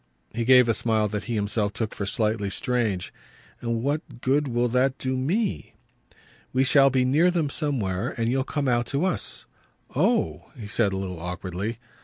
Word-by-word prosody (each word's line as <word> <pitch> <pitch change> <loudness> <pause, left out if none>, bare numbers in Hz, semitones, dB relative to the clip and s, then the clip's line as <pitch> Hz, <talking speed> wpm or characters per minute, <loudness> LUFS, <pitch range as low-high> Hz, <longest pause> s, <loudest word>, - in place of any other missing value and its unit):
He 115 +1 -2
gave 125 -1 +7
a 115 - +3
smile 110 -1 +1
that 105 0 -4
he 120 - -2
himself 105 0 -1
took 110 0 -3
for 100 - -4
slightly 105 -2 0
strange. 110 -6 -1 0.5
"And 115 -1 -2
what 145 -3 -3
good 140 +3 +2
will 120 -1 +1
that 130 +2 +2
do 130 0 -2
ME?" 180 - -1 0.8
"We 130 +1 +2
shall 135 +1 +6
be 130 -1 +2
near 155 +8 +4
them 165 -5 0
somewhere, 120 - -2
and 115 -1 0
you'll 130 +2 +1
come 145 0 -2
out 120 -1 +1
to 140 +7 0
us." 185 - -2 0.5
"Oh!" 210 - +1
he 110 - -7
said 105 -1 +1
a 95 - -2
little 95 -3 -4
awkwardly. 90 +5 -4
120 Hz, 180 wpm, -25 LUFS, 105-135 Hz, 0.8 s, gave